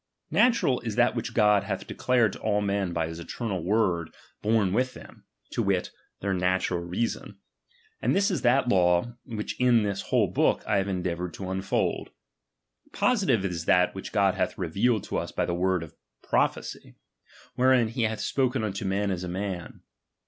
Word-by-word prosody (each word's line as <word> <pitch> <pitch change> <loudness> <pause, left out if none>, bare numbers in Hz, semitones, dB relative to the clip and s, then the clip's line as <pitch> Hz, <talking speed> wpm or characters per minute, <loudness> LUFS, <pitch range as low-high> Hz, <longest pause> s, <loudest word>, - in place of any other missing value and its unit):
Natural 215 - +3
is 110 -3 -4
i». 120 - +6
that 120 - +1
which 115 - -4
God 105 -2 +5
hath 100 - -3
declared 120 -5 +1
to - - -9
all 105 -1 +1
men 100 -2 -1
by 85 -1 -1
his 80 +1 -7
eternal 95 0 -4
word 90 -4 +1 0.3
born 105 -3 +2
with 125 +3 0
them, - - -14 0.3
to - - -1
wit, - - 0 0.3
their 100 0 0
natural 90 -1 0
reason; 90 +7 -3 0.6
and - - +1
this 200 +2 +2
is 180 - -1
that 125 +1 +3
law, 90 +3 +2
which 110 -4 -5
in 120 -3 +4
this 100 -1 -2
whole - - +4
book - - +1
I 105 - +1
have 95 0 0
endeavoured 90 -2 -3
to 95 -1 -5
unfold. 95 +1 -1 0.8
Positive 180 - +2
is 85 -3 -3
that, 90 +1 +3
which 95 - -7
God 100 -3 +3
hath - - -2
revealed 100 +6 +1
to - - -3
us - - -5
by - - -1
the 85 - -2
word 90 0 +1
of 80 - -11 0.3
prophecy, - - -1 0.6
wherein 125 -2 +3
he 120 +2 -3
hath 110 -1 0
spoken 130 -3 0
unto 100 -2 -3
men 100 +1 0
as 90 -1 -3
a 90 - -4
man. 95 -2 -5
100 Hz, 180 wpm, -27 LUFS, 90-120 Hz, 0.8 s, i